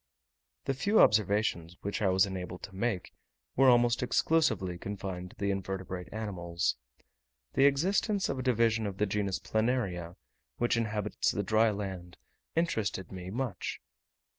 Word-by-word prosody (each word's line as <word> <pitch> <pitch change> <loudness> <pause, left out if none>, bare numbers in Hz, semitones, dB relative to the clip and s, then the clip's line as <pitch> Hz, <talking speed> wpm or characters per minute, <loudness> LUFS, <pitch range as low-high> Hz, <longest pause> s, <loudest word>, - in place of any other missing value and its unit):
The 135 - +1
few 200 +11 +2
observations 100 -5 +3
which 100 +3 -3
I 100 - +3
was 95 +1 +4
enabled 90 -2 -6
to 100 - -8
make 100 -2 -2 0.4
were 135 0 +6
almost 120 -1 +4
exclusively 125 - +1
confined 95 -2 -5
to - - -17
the 100 0 -1
invertebrate 95 -1 -4
animals. 85 - -2 0.8
The 135 - +4
existence 190 +8 +2
of 135 - -2
a - - -1
division 115 -3 +2
of 95 -1 -5
the 105 - +2
genus 100 -1 -1
Planaria, 105 -7 -1 0.4
which 120 0 +2
inhabits 105 -2 0
the 100 - -1
dry 110 +3 +4
land, 95 -4 -5 0.4
interested 110 - -1
me 90 -1 -7
much. 115 -2 -3
105 Hz, 140 wpm, -31 LUFS, 95-120 Hz, 0.8 s, were